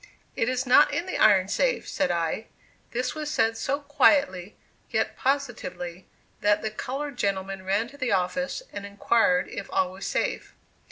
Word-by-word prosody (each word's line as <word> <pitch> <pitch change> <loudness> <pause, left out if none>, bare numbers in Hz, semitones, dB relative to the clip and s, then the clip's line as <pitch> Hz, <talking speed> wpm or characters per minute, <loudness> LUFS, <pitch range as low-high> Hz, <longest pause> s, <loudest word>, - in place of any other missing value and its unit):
"It 230 - +1
is 255 +1 -1
not 250 +3 +6
in 335 +5 -1
the 370 - -3
iron 195 -3 +5
safe!" - - 0
said - - 0
I. 170 +5 -1 0.4
This 250 +1 -2
was 305 -1 -4
said 225 -6 +1
so 280 +5 -2
quietly, 280 -9 +2 0.3
yet - - 0
positively, 190 -10 -3 0.3
that 205 0 +2
the 220 - -2
colored 270 +4 -5
gentleman 195 -1 -1
ran 200 +4 0
to 285 +1 -15
the 255 -3 -1
office, 270 - -1
and 200 - -5
inquired 200 -2 +2
if 200 - -7
all 185 -1 +1
was 190 +1 -6
safe. - - -2
225 Hz, 165 wpm, -26 LUFS, 190-275 Hz, 0.4 s, not